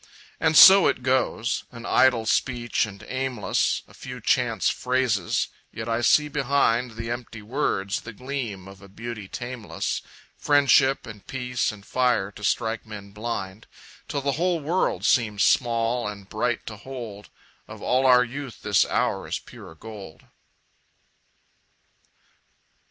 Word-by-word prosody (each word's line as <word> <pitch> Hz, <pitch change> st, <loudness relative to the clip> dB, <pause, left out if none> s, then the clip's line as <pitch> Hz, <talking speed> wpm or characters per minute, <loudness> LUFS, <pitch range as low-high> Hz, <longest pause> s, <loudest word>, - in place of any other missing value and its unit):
And 155 Hz, -, +3 dB
so 195 Hz, 0 st, +10 dB
it 125 Hz, -, -1 dB
goes 130 Hz, -2 st, 0 dB
an 115 Hz, -1 st, -10 dB
idle 120 Hz, -3 st, +3 dB
speech 120 Hz, 0 st, 0 dB
and 100 Hz, 0 st, -11 dB
aimless, 130 Hz, -4 st, -1 dB
A -, -, -19 dB
few -, -, -8 dB
chance -, -, +1 dB
phrases; 125 Hz, -7 st, 0 dB, 0.2 s
yet 110 Hz, +1 st, -6 dB
I 115 Hz, 0 st, 0 dB
see 150 Hz, +4 st, +4 dB
behind 130 Hz, -4 st, +1 dB
The 115 Hz, 0 st, -5 dB
empty 120 Hz, -3 st, -6 dB
words 105 Hz, -5 st, -1 dB
the 115 Hz, -, -8 dB
gleam 120 Hz, -5 st, -5 dB
of 95 Hz, 0 st, -13 dB
a 100 Hz, -, -14 dB
beauty 110 Hz, 0 st, -7 dB
tameless, 115 Hz, -7 st, -4 dB, 0.3 s
Friendship 140 Hz, -2 st, +3 dB
and 105 Hz, -3 st, -11 dB
peace 125 Hz, -3 st, -2 dB
and 105 Hz, -2 st, -13 dB
fire 125 Hz, -6 st, +1 dB
to 105 Hz, -, -13 dB
strike 110 Hz, +2 st, 0 dB
men 105 Hz, -2 st, -10 dB
blind, 105 Hz, -1 st, -5 dB, 0.4 s
Till 145 Hz, -2 st, -2 dB
the 140 Hz, 0 st, 0 dB
whole 180 Hz, -1 st, +2 dB
world 165 Hz, +5 st, -1 dB
seems 105 Hz, -5 st, +2 dB
small 115 Hz, -1 st, +2 dB
and 100 Hz, -2 st, -8 dB
bright 115 Hz, +3 st, -2 dB
to 105 Hz, -, -7 dB
hold 115 Hz, -4 st, -8 dB, 0.4 s
Of -, -, -10 dB
all 130 Hz, +1 st, +2 dB
our 125 Hz, -1 st, +7 dB
youth 130 Hz, +1 st, -8 dB
this 100 Hz, -2 st, +4 dB
hour -, -, -1 dB
is -, -, -2 dB
pure 80 Hz, -, -13 dB
gold. 100 Hz, -2 st, -11 dB
115 Hz, 140 wpm, -25 LUFS, 105-130 Hz, 0.4 s, so